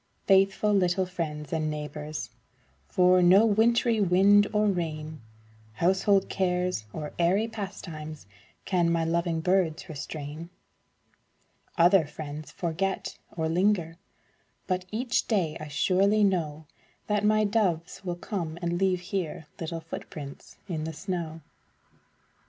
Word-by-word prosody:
Faithful 195 Hz, +2 st, +4 dB
little 185 Hz, -1 st, +2 dB
friends 155 Hz, -5 st, -5 dB
and 155 Hz, -1 st, 0 dB
neighbors, 150 Hz, 0 st, -5 dB, 0.6 s
For 180 Hz, -, +4 dB
no 185 Hz, +5 st, +6 dB
wintry 225 Hz, +1 st, +3 dB
wind 200 Hz, +2 st, +5 dB
or 210 Hz, 0 st, +2 dB
rain, 155 Hz, -, -2 dB, 0.5 s
Household 190 Hz, -, +2 dB
cares 180 Hz, -, -1 dB
or 150 Hz, +4 st, -6 dB
airy 190 Hz, +6 st, +3 dB
pastimes, 170 Hz, -8 st, -7 dB, 0.4 s
Can 175 Hz, -3 st, +2 dB
my 165 Hz, -1 st, +1 dB
loving 170 Hz, 0 st, 0 dB
birds 180 Hz, -2 st, +1 dB
restrain. 155 Hz, +1 st, -7 dB, 1.3 s
Other 175 Hz, -1 st, +5 dB
friends 150 Hz, 0 st, -7 dB
forget, 185 Hz, +3 st, -3 dB, 0.2 s
or 160 Hz, -1 st, 0 dB
linger, 170 Hz, -1 st, +1 dB, 0.7 s
But 185 Hz, -1 st, -1 dB
each 240 Hz, +4 st, 0 dB
day 180 Hz, -9 st, +1 dB
I 155 Hz, -, -6 dB
surely 195 Hz, +8 st, +2 dB
know 160 Hz, -6 st, 0 dB, 0.4 s
That 210 Hz, -1 st, 0 dB
my 215 Hz, 0 st, +4 dB
doves 195 Hz, -5 st, 0 dB
will 175 Hz, -2 st, -3 dB
come 170 Hz, -3 st, -4 dB
and 175 Hz, 0 st, -1 dB
leave 185 Hz, -2 st, +1 dB
here 180 Hz, -3 st, -4 dB
Little 165 Hz, 0 st, -4 dB
footprints 150 Hz, -3 st, -9 dB
in 160 Hz, -5 st, -3 dB
the 160 Hz, -, -4 dB
snow. 165 Hz, -1 st, -4 dB
175 Hz, 120 wpm, -27 LUFS, 160-195 Hz, 1.3 s, no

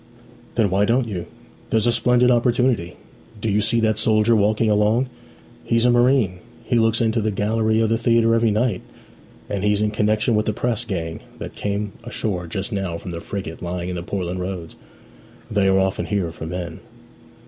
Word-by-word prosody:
'Then 110 Hz, -5 st, +2 dB
why 100 Hz, +2 st, +3 dB
don't 120 Hz, +3 st, +2 dB
you? 90 Hz, -5 st, -5 dB, 0.4 s
There's 110 Hz, -1 st, +2 dB
a 120 Hz, -, +4 dB
splendid 125 Hz, +1 st, +3 dB
opportunity. 120 Hz, -6 st, +1 dB, 0.4 s
Do 110 Hz, 0 st, -1 dB
you 105 Hz, +1 st, +2 dB
see 115 Hz, +3 st, +2 dB
that 110 Hz, -1 st, +1 dB
soldier 110 Hz, +1 st, +3 dB
walking 110 Hz, +2 st, +2 dB
along? 105 Hz, +4 st, +2 dB, 0.5 s
He's 115 Hz, 0 st, +1 dB
a 125 Hz, -, +5 dB
marine; 120 Hz, -6 st, +3 dB, 0.2 s
he 120 Hz, -, +1 dB
looks 115 Hz, 0 st, +2 dB
into 115 Hz, 0 st, +1 dB
the 110 Hz, -, 0 dB
gallery 110 Hz, +2 st, +1 dB
of 110 Hz, -, +2 dB
the 115 Hz, 0 st, +1 dB
theatre 115 Hz, -1 st, +3 dB
every 115 Hz, 0 st, +3 dB
night: 110 Hz, -2 st, 0 dB, 0.7 s
and 100 Hz, -1 st, -3 dB
he's 105 Hz, 0 st, +2 dB
in 105 Hz, 0 st, +1 dB
connexion 105 Hz, +2 st, +1 dB
with 110 Hz, 0 st, +1 dB
the 110 Hz, -, +1 dB
press 120 Hz, 0 st, -1 dB
gang 85 Hz, -6 st, -4 dB, 0.2 s
that -, -, -7 dB
came 100 Hz, 0 st, -3 dB
ashore 100 Hz, -7 st, -3 dB
just 95 Hz, +6 st, -4 dB
now 95 Hz, -5 st, -2 dB
from 90 Hz, -, -8 dB
the 85 Hz, -1 st, -5 dB
frigate 95 Hz, -5 st, -6 dB
lying 90 Hz, 0 st, -4 dB
in 90 Hz, -2 st, -4 dB
Portland 90 Hz, -2 st, -3 dB
Roads. 90 Hz, -3 st, -5 dB, 0.8 s
They 100 Hz, -2 st, +2 dB
are 95 Hz, 0 st, +4 dB
often 95 Hz, 0 st, 0 dB
here 95 Hz, -5 st, -1 dB
for 80 Hz, 0 st, -7 dB
men.' 85 Hz, -1 st, -5 dB
105 Hz, 185 wpm, -22 LUFS, 95-115 Hz, 0.8 s, a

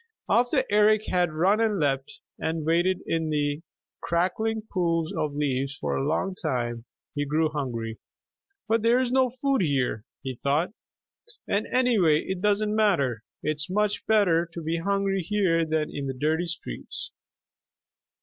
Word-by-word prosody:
After 245 Hz, +1 st, +3 dB
Eric 210 Hz, +1 st, +4 dB
had 180 Hz, -2 st, +1 dB
run 185 Hz, +7 st, +2 dB
and 220 Hz, -3 st, +2 dB
leapt 135 Hz, -2 st, -1 dB, 0.2 s
and 160 Hz, -1 st, -2 dB
waded 175 Hz, +3 st, +2 dB
in 160 Hz, -1 st, -1 dB
the 145 Hz, 0 st, 0 dB, 0.4 s
crackling 215 Hz, +6 st, 0 dB
pools 165 Hz, -3 st, 0 dB
of 145 Hz, -1 st, -2 dB
leaves 140 Hz, -1 st, -1 dB
for -, -, -2 dB
a -, -, -1 dB
long 160 Hz, +6 st, 0 dB
time, 120 Hz, -9 st, -3 dB, 0.3 s
he 145 Hz, -, -1 dB
grew 155 Hz, +2 st, +1 dB
hungry. 120 Hz, -7 st, -4 dB, 0.7 s
"But 225 Hz, 0 st, +2 dB
there 230 Hz, +3 st, +4 dB
is 255 Hz, -1 st, 0 dB
no 260 Hz, 0 st, +3 dB
food 265 Hz, 0 st, 0 dB
here," 135 Hz, -, 0 dB, 0.2 s
he 130 Hz, -, -3 dB
thought; 145 Hz, +9 st, 0 dB, 0.8 s
"and 205 Hz, +2 st, 0 dB
anyway 210 Hz, -12 st, +3 dB
it 190 Hz, -1 st, -4 dB
doesn't 210 Hz, +1 st, +1 dB
matter. 140 Hz, -, +2 dB, 0.2 s
It's 155 Hz, +2 st, -1 dB
much 210 Hz, +2 st, 0 dB
better 180 Hz, -6 st, +3 dB
to 170 Hz, -1 st, -7 dB
be 165 Hz, +2 st, -1 dB
hungry 195 Hz, +2 st, 0 dB
here 175 Hz, -3 st, +1 dB
than 155 Hz, -1 st, 0 dB
in 140 Hz, -1 st, -3 dB
the 135 Hz, -, -3 dB
dirty 160 Hz, +4 st, +1 dB
streets." 165 Hz, -, -6 dB
165 Hz, 150 wpm, -26 LUFS, 145-210 Hz, 0.8 s, Eric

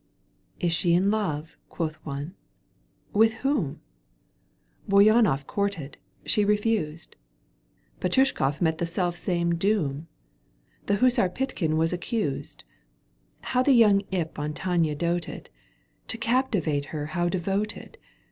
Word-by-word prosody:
Is 170 Hz, -1 st, +1 dB
she 170 Hz, 0 st, +2 dB
in 190 Hz, +3 st, +3 dB
love 165 Hz, -8 st, -2 dB
?" -, -, -42 dB
quoth 155 Hz, -2 st, -3 dB
one. 145 Hz, +3 st, -5 dB, 0.4 s
" -, -, -40 dB, 0.3 s
With 220 Hz, +2 st, +4 dB
whom? 250 Hz, -, 0 dB, 1.1 s
BouyJmoff 200 Hz, -, +5 dB
courted. 200 Hz, -8 st, -3 dB, 0.3 s
She 210 Hz, -, +2 dB
refused. 205 Hz, -6 st, -1 dB, 0.8 s
Petoushkofif 180 Hz, -, +1 dB
met 160 Hz, -2 st, +1 dB
the 170 Hz, -, -1 dB
selfsame 175 Hz, -1 st, -1 dB
doom. 165 Hz, -6 st, 0 dB, 0.8 s
The 205 Hz, -, +3 dB
hussar 245 Hz, -3 st, +3 dB
Pykhtin 180 Hz, -8 st, -2 dB
was 165 Hz, +2 st, +1 dB
accused. 175 Hz, -, -3 dB, 0.8 s
How 255 Hz, -, 0 dB
the 270 Hz, +1 st, +4 dB
young 215 Hz, -5 st, +6 dB
imp 170 Hz, -5 st, -3 dB
on 150 Hz, +1 st, -3 dB
Tania 170 Hz, -4 st, 0 dB
doted! 170 Hz, +2 st, -3 dB, 0.6 s
To 225 Hz, -, -1 dB
captivate 205 Hz, -, 0 dB
her 150 Hz, -1 st, -5 dB
how 175 Hz, -1 st, +1 dB
devoted 195 Hz, +4 st, -3 dB
175 Hz, 120 wpm, -26 LUFS, 160-210 Hz, 1.1 s, young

